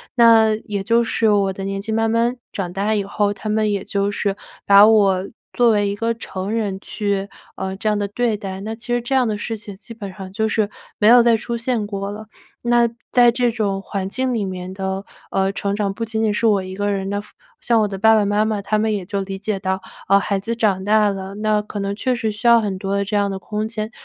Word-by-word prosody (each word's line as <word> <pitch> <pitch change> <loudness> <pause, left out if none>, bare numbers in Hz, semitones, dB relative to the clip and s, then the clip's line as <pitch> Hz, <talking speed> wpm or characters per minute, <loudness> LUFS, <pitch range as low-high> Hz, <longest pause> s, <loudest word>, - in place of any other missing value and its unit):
那 225 -2 +6
也 200 -3 -3
就 230 +3 +3
是 225 -1 +1
我 200 -2 +2
的 195 - -6
年 195 0 -3
纪 220 - -5
慢 225 0 +1
慢 235 +2 +1 0.2
长 180 -3 -4
大 205 +3 0
以 205 -2 0
后， 205 0 0
他 215 +2 -6
们 215 0 +1
也 200 -1 -2
就 200 0 -1
是 200 -1 -1 0.3
把 200 +1 +8
我 195 -4 +4 0.3
作 240 -2 +4
为 205 -1 +2
一 200 - -2
个 230 +2 -1
成 195 -3 -5
人 210 -4 -1
去， 200 -1 -2 0.3
呃， 190 0 -4
这 215 +2 -1
样 210 - +1
地 205 -1 -1
对 230 -1 0
待， 195 -1 -6
那 220 +2 -4
其 230 +2 -13
实 240 - +1
这 240 +3 -2
样 255 -2 +3
的 215 - -1
事 225 +1 -4
情 205 -1 -9
基 225 +3 -11
本 200 -4 -7
上 190 -1 -9
就 220 +3 0
是 220 -2 0 0.3
没 210 - +4
有 240 0 +8
再 235 -1 +5
出 235 +2 -4
现 230 -3 -1
过 200 -1 -4
了。 215 +1 -8 0.3
那 240 0 +3 0.2
在 240 -1 +6
这 245 0 +1
种 205 -4 -1
环 195 -1 -4
境 260 +4 -1
里 210 -4 -1
面 185 -1 -5
的， 190 0 -3 0.3
呃， 195 0 +1
成 200 0 -2
长， 205 -1 -1
不 230 +3 -4
仅 220 0 -2
仅 220 - +2
是 230 - 0
我 205 -3 +4
一 185 0 -7
个 205 +1 -1
人 195 -1 -2
的 205 - -1
付 210 - -16 0.3
像 230 -2 +3
我 210 - +2
的 195 -1 -5
爸 220 +3 +5
爸 215 - +3
妈 205 +1 +2
妈， 215 -2 -1
他 215 +2 0
们 215 0 +1
也 200 -3 -2
就 200 -1 -2
理 195 0 -6
解 205 0 -2
到， 190 0 -2 0.3
呃， 195 +1 +5
孩 200 0 -1
子 230 +4 -3
长 200 -5 +1
大 210 0 +3
了， 195 0 -5
那 215 0 +1
可 210 0 -6
能 200 0 -2
确 255 +3 0
实 225 -3 -1
需 210 +3 -10
要 235 -1 +7
很 200 -3 -2
多 195 +1 -2
的 200 - +1
这 205 +2 -3
样 200 -1 +1
的 190 - -4
空 210 +3 -3
间。 220 0 -4
210 Hz, 275 characters per minute, -20 LUFS, 195-225 Hz, 0.3 s, 把